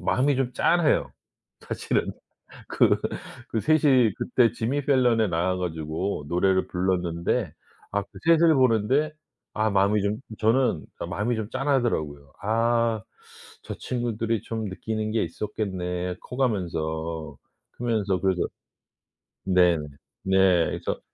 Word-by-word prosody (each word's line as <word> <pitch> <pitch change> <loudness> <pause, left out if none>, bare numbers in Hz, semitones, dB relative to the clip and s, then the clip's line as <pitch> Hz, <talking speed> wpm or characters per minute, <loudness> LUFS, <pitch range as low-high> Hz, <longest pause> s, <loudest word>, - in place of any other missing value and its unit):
마음이 140 +3 +2
좀 130 -1 -1
짠해요 165 +4 +2 0.5
사실은. - - -2 0.6
그 - - +3 0.5
그 110 - -1
셋이 135 -6 +4
그때 120 -3 +2
지미 130 +5 -2
펠런에 125 -6 +3
나와 90 +2 0
가지고 80 0 -3
노래를 95 +3 +2
불렀는데 90 -2 -1 0.4
아 100 0 0
그 - - -16 0.2
셋을 165 0 +5
보는데 130 +4 +2 0.4
아 110 0 +1
마음이 100 +1 +2
좀 100 +1 0 0.2
저는 120 +4 +2
그니까 - - -5
마음이 105 +7 -1
좀 110 -2 -4
짠하더라고요. 115 - -1
아. 115 +1 +1 0.6
'저 - - -6
친구들이 115 -3 -2
좀 110 -1 -4
느끼는 110 +2 -3
게 110 - +1
있었겠네.' 90 -1 -3
커 125 - -9
가면서 80 - -2 0.4
크면서 105 -6 -1
그래서 95 -2 +1 1.0
네. 90 -2 +4 0.5
네. 95 -3 +4
그래서 - - -3
105 Hz, 255 characters per minute, -25 LUFS, 90-120 Hz, 1.0 s, 셋을